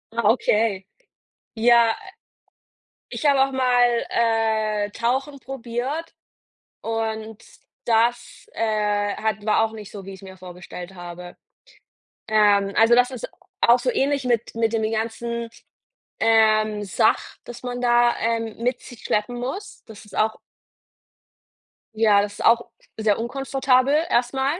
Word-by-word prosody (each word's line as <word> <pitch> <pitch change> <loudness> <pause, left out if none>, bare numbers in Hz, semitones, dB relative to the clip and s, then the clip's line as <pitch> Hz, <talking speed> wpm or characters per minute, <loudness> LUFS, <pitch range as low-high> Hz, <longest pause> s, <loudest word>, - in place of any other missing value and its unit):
Ah, 230 -3 +2
okay. 210 -5 0 0.7
Ja, 235 0 +4 1.1
ich - - -6
habe 280 -2 +5
auch 270 - -4
mal, 245 -2 +2
äh, 220 -2 0
Tauchen 265 +6 -2
probiert, 265 +5 -5 0.7
und 220 -1 -4 0.4
das, 235 +1 0
äh, 210 -2 0
hat 215 -1 -2
war 220 +1 +3
auch 225 - -3
nicht 215 -2 -10
so, 200 -2 -9
wie 195 - -7
ich's 190 - -15
mir 190 -1 -11
vorgestellt 180 0 -10
habe. 175 0 -9 0.9
Ähm, 205 -2 +3
also 225 +2 +5
das 250 +1 +4
ist 255 -3 -6 0.3
auch 240 +1 +6
so - - 0
ähnlich 280 - 0
mit 235 -2 -1
mit 230 0 0
den 220 -1 0
ganzen, 230 +1 -3 0.7
ähm, 215 -1 +3
Sach 220 +3 0
das 240 0 -10
man 245 0 -4
da, 240 0 +4
ähm, 230 -1 -1
mit 250 +2 0
sich 245 -3 -12
schleppen 215 +3 -1
muss. 270 - -6
Das 220 -3 -12
ist 200 - -12
auch 220 0 +1 1.6
Ja, 210 -2 +4
das 205 0 -4
ist - - -5
auch 235 +1 +4 0.3
sehr 215 -1 +1
unkomfortabel 270 +2 +1 0.2
erstmal. 265 +6 0
225 Hz, 130 wpm, -23 LUFS, 215-245 Hz, 1.6 s, auch